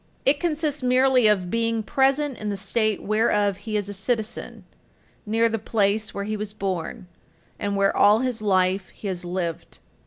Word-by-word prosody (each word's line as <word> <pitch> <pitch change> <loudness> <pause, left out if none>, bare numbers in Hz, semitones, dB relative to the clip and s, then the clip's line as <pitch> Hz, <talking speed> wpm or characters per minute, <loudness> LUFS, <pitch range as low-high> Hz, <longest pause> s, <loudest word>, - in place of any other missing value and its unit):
It 285 +2 +3
consists 305 -3 -1
merely 255 -1 +4
of 190 -4 +1
being 230 -1 0
present 270 +3 +1
in 210 - -3
the 200 - -2
state 215 +2 0
whereof 210 -2 +1
he 215 +1 -3
is 205 -1 -2
a 205 - -5
citizen, 220 +3 -3 0.6
near 225 +2 +3
the 225 -1 -2
place 210 0 0
where 200 - -4
he 215 +1 -3
was 210 0 -4
born, 190 -4 -4 0.5
and 200 0 -2
where 195 0 +2
all 210 +3 +5
his 250 -4 -2
life 190 -1 +1
he 210 - -9
has 180 -1 -4
lived. 175 -2 -4
215 Hz, 175 wpm, -24 LUFS, 200-235 Hz, 0.6 s, all